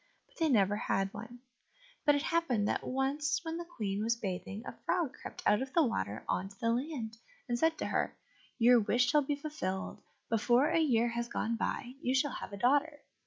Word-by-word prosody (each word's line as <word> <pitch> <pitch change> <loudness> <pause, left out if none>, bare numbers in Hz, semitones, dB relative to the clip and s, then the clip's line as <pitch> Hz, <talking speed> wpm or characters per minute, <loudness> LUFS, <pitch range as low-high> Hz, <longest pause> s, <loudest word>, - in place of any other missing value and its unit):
but - - -29
they 325 -1 +3
never 205 -5 +4
had 195 -2 -1
one. 230 +3 -9 0.6
But 290 -2 +6
it 285 - 0
happened 260 -12 +1
that - - 0
once 270 +2 0
when 325 0 -3
the 345 - -4
Queen 210 - -3
was 230 +1 +2
bathing, 195 0 -5
a - - -4
frog 340 -7 0
crept - - -9
out 210 +3 +4
of 265 0 -5
the 335 - +5
water 100 - -2
on 190 +2 -1
to 195 - -18
the 230 -2 +1
land, 240 -3 -3 0.3
and 240 -1 -1
said 320 +2 +3
to - - -3
her, - - -1 0.4
"Your 245 0 +6
wish 245 +4 +2
shall 300 - +5
be 285 +1 -1
fulfilled; 280 -11 -4 0.3
before 240 +5 +3
a - - +3
year 240 -7 +3
has 235 0 -2
gone 230 -1 -1
by, 240 +1 -3
you 255 +2 +1
shall 275 +1 +2
have - - -6
a 200 - -6
daughter." 290 +5 +2
245 Hz, 210 wpm, -32 LUFS, 215-290 Hz, 0.6 s, But